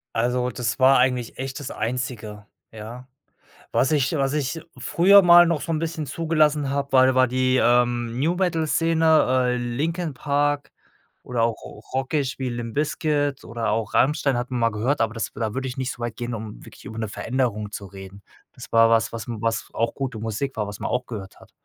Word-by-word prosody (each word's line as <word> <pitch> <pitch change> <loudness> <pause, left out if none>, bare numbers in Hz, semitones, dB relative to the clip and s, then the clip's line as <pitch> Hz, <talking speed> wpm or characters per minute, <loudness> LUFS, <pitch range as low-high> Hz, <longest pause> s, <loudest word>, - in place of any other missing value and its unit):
Also, 125 +2 +1
das 120 -3 -3
war 130 +1 +6
eigentlich 125 -2 0
echt 135 +1 -5
das 140 -2 -6
Einzige, 110 -3 -4 0.2
ja. 115 +4 -9 0.6
Was 135 - +2
ich 145 0 +1
was 135 -1 0
ich 150 +2 -2 0.2
früher 180 +10 +6
mal 175 -1 +8
noch 165 -3 0
so 165 - -3
'n 155 - 0
bisschen 160 -1 -3
zugelassen 150 -1 +1
habe, 140 0 -2
war 130 0 +5
war 130 -1 +4
die, 130 +1 +1
ähm, 120 0 +2
New-Metal-Szene, 165 0 +1 0.5
äh, 125 - 0
Linkin 150 +7 -2
Park 145 +1 0 0.5
oder 120 -2 -2
auch 115 -1 +1
r 105 - -11
rockig, 135 +1 -1
wie 130 -1 -2
Limp 120 -1 -5
Bizkit 145 -1 -1
oder 115 0 -3
auch 110 0 -2
Rammstein, 135 -1 +2
hat 125 +2 -4
man 125 -1 -2
mal 115 0 +3
gehört, 115 +7 -1
aber 115 0 0
das 115 - -3
da 110 -2 -3
würde 130 0 -3
ich 125 - -7
nicht 130 -1 -2
so - - -14
weit 120 -2 -4
gehen, 120 0 -4
um 110 -1 -8
wirklich - - -14
über 110 +2 -7
'ne 110 -1 -2
Veränderung 110 -2 -2
zu 105 - -7
reden. 95 +1 -12 0.3
Das - - -12
war 115 0 +6
was 115 0 +2
was 115 -2 -6
was 115 -1 -2
auch 115 +1 -1
gute 130 -5 -4
Musik 115 +5 -3
war, 105 - -1
was 100 +1 -8
man - - -3
auch 125 0 -1
gehört 100 -5 -8
hat. - - -18
125 Hz, 200 wpm, -23 LUFS, 115-145 Hz, 0.6 s, mal